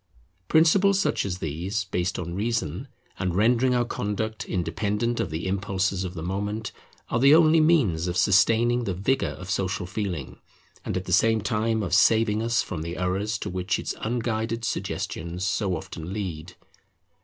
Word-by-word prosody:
Principles 190 +5 +4
such 200 - +1
as 90 -2 -3
these, 90 +7 -3
based 95 -1 -2
on 85 -1 -4
reason, 105 -5 -2 0.3
and 90 -2 -1
rendering 120 +5 +3
our 120 0 +2
conduct 110 0 -3
independent 105 +7 -1
of - - -1
the 80 +3 -4
impulses 95 0 -1
of 90 -1 -5
the 80 - -5
moment, 100 +4 -3 0.4
are 120 - 0
the 140 +4 +7
only 160 0 +5
means 125 - +3
of 90 0 -2
sustaining 115 +6 +3
the 95 - -2
vigour 130 +9 0
of 90 +1 -7
Social 95 -1 -1
Feeling, 90 -7 -4 0.4
and - - -2
at 90 - -4
the 90 - -2
same 110 +3 +4
time 110 +1 0
of 90 -2 -3
saving 110 +3 +4
us 115 +1 +1
from 80 - -5
the 85 +2 -5
errors 95 +4 -1
to - - -5
which 90 +1 -1
its - - -3
unguided 115 0 -2
suggestions 85 -3 -3
so 95 -1 0
often 80 +2 -8
lead. 90 -4 -5
100 Hz, 165 wpm, -25 LUFS, 90-115 Hz, 0.4 s, the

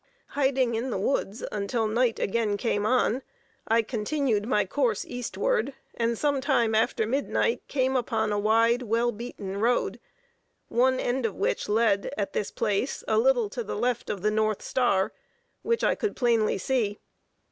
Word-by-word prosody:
Hiding 265 -3 +1
in 235 +4 -2
the 225 - -2
woods 205 +1 -1
until 210 +3 -1
night 230 +2 +1
again 210 0 0
came 205 -1 0
on, 255 0 +2 0.5
I 225 +1 +3
continued 225 -1 -1
my 210 -5 +2
course 235 +1 0
eastward, 240 +2 -1 0.2
and 230 0 -1
some 285 0 +1
time 240 -5 +2
after 220 0 +2
midnight 280 - 0
came 260 -1 0
upon 225 -3 0
a 205 - 0
wide, 230 +3 +3
well 235 +1 +1
beaten 205 -4 -6
road, 240 +3 +1 0.7
one 260 +2 +2
end 245 -1 0
of 205 - -7
which - - -1
led, 210 -2 +2
at 200 - -2
this 205 - -1
place, 215 +3 -1
a - - +3
little - - +3
to 480 - -4
the - - -5
left 240 +1 -1
of 195 -2 -4
the 210 - +2
north 215 -1 0
star, 200 -7 +1 0.5
which 465 0 0
I - - +4
could 430 - -2
plainly 230 -5 +2
see. 210 -1 0
230 Hz, 165 wpm, -27 LUFS, 210-260 Hz, 0.7 s, I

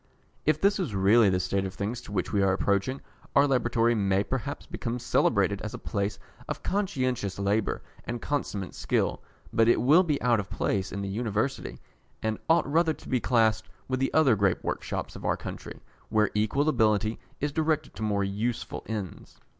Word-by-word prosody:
If 155 0 +3
this 200 +3 +3
is 145 - -2
really 100 +3 +5
the 90 -1 +1
state 95 +1 0
of 95 -1 -5
things 110 +4 -3
to - - -11
which 95 0 -2
we 100 - +3
are 95 -1 +3
approaching, 100 +7 0 0.3
our 140 - +6
Laboratory 120 -3 +2
may 100 -3 +2
perhaps 135 +5 -4
become 120 -1 -4
celebrated 125 - +2
as - - -5
a - - -5
place 100 +1 -2 0.3
of - - -5
conscientious 130 - -1
labour 100 +2 0 0.2
and 120 0 -4
consummate 110 -8 -3
skill, - - 0 0.3
but 115 0 +4
it 120 - +5
will 150 +8 +6
be 155 -6 0
out 120 -3 +3
of 100 - -5
place 95 -1 -1
in 100 0 -4
the - - -3
University, 110 +5 -2 0.5
and 110 -1 -1
ought 165 0 +4
rather 160 +3 +2
to - - -15
be 130 - +2
classed 110 -4 +2 0.2
with 130 0 -1
the 135 - 0
other 145 -7 +5
great 100 -3 +1
workshops - - -3
of - - -9
our - - +1
country, - - -8 0.3
where 105 -1 +2
equal 110 +8 +1
ability 110 -5 +2 0.2
is 145 +1 -1
directed 155 0 0
to - - -10
more 105 -2 +1
useful 105 +5 -2
ends. 105 -5 -6
115 Hz, 185 wpm, -28 LUFS, 100-135 Hz, 0.5 s, our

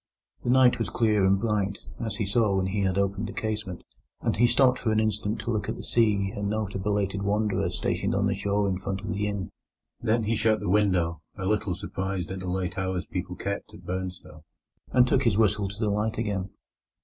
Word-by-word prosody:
The 120 - -2
night 125 -1 +5
was 115 - -1
clear 110 -4 +2
and 95 +1 +4
bright, 100 -2 0 0.3
as 110 -2 -2
he 105 - -1
saw 100 0 +2
when 95 - +1
he 95 +2 -1
had 95 -1 +1
opened 100 +2 0
the - - -7
casement, 105 -5 -3 0.4
and - - 0
he 120 +2 +5
stopped 130 0 +4
for 110 - 0
an 110 - +3
instant 110 0 0
to 120 - -2
look 110 -2 -1
at - - -2
the - - -8
sea 105 -4 +2
and 100 0 -2
note 105 -1 -2
a - - -3
belated 100 0 0
wanderer 105 +1 +1
stationed - - -1
on 100 0 +2
the 100 - +2
shore 100 +1 0
in 95 -1 -1
front 95 0 -3
of 105 - -6
the 105 0 -1
inn. 100 -2 -3 0.5
Then 115 0 +2
he 110 +2 +1
shut 110 0 +2
the 105 - -3
window, 90 -5 +2 0.2
a 95 - -4
little 105 -2 0
surprised 95 0 -3
at 95 - -4
the 95 -1 -4
late 90 0 -2
hours 95 -1 -2
people 90 -1 -4
kept 100 +2 -4
at 90 - -14
Burnstow, 90 -3 -5 0.5
and 125 0 +5
took 130 - +3
his 115 -6 +2
whistle 105 -2 +3
to 100 +2 -8
the 110 -3 +1
light 105 +2 0
again. 100 -4 -2
100 Hz, 225 wpm, -27 LUFS, 95-110 Hz, 0.5 s, night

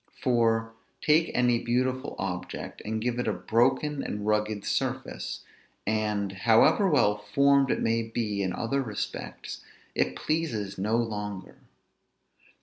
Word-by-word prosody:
For, 115 -2 +2 0.3
take 160 +2 +3
any 125 -1 +3
beautiful 130 +3 0
object, 90 -2 -5
and 110 +1 -2
give 120 +2 -1
it 125 - -1
a 110 - +2
broken, 125 +9 +1
and 105 0 -4
rugged 105 -1 0
surface; - - -2 0.4
and, 105 -2 0
however 115 - +4
well 105 -9 +3
formed 140 +6 +3
it - - 0
may 115 0 +2
be 110 -3 -2
in 95 -1 0
other 125 +8 -1
respects, 110 -6 -5 0.3
it 65 - 0
pleases 110 - -2
no 105 +4 +1
longer. 105 -4 -4
115 Hz, 130 wpm, -28 LUFS, 105-125 Hz, 0.4 s, however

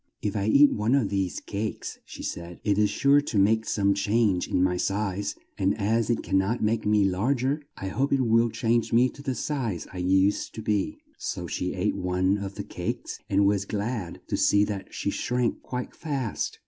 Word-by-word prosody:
"If 105 -1 -1
I 100 0 0
eat 140 +6 +6
one 110 +5 +1
of 125 -8 +2
these 95 -2 -1
cakes," 105 +2 -5
she - - -9
said, 85 0 -6
"it 100 -1 +2
is 105 -1 +4
sure 140 +6 +4
to 125 -6 -3
make 110 +3 +3
some 100 -1 +2
change 100 -1 +1
in 90 - +1
my 90 -1 +2
size; 100 +1 -1 0.2
and 100 +2 +2
as 110 +3 +1
it 120 - 0
can't 95 +5 +1
make 110 0 +1
me 105 -1 +4
larg 110 +8 +1
er, 145 +3 0 0.2
I 95 - -4
hope 135 +8 0
it 135 - +3
will 115 +1 +4
change 115 0 0
me 120 +2 +4
to 140 - -12
the 135 -2 -2
size 120 - -2
I - - -7
used 95 +2 +2
to 110 - -6
be." 105 -2 0 0.2
So - - -4
she 90 - -3
ate 95 +3 0
one 90 +2 +1
of 100 0 -5
the - - -4
cakes - - -5
and 100 +1 +3
was 100 0 +2
glad 105 -3 -3
to - - -2
see 100 0 +4
that 100 -2 -4
she - - -2
shrank 125 -1 -1
quite 125 -1 -5
fast. 135 -8 -3
105 Hz, 205 wpm, -26 LUFS, 95-120 Hz, 0.2 s, eat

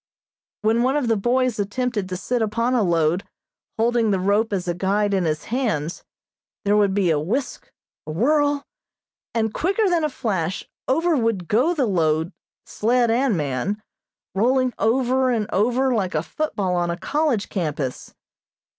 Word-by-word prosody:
When 225 +2 +3
one 260 +3 +2
of 275 -5 0
the 225 - +3
boys 240 +2 +1
attempted 205 -1 -2
to 185 - -3
sit 245 +5 -1
upon 230 +3 0
a 245 - +3
load, 170 -1 +2 0.5
holding 230 0 +2
the 195 -2 +1
rope 205 +4 +1
as 190 -2 -2
a 175 - +1
guide 200 +3 0
in 190 -3 +1
his 155 -1 -1
hands, 175 - -1 0.6
there 205 +1 +3
would 200 -2 +3
be 190 -4 +2
a 150 - +2
whisk, 240 - -3 0.4
a - - -3
whirl, 290 - +2 0.7
and 220 -1 0
quicker 395 +5 +1
than 340 -3 +1
a 305 - +1
flash 190 - -2 0.2
over 325 +5 +2
would 225 - 0
go 265 +11 +2
the 280 -5 +2
load, 165 -3 +1 0.3
sled 235 +1 +1
and 240 -3 +2
man, 145 +8 -2 0.5
rolling 255 +5 +2
over 255 +3 +2
and 225 -4 0
over 250 +6 +2
like 190 -7 -1
a 155 - +1
football 195 - -2
on 175 -1 0
a 170 - -2
college 290 - 0
campus. 150 -8 -3
220 Hz, 165 wpm, -22 LUFS, 185-255 Hz, 0.7 s, When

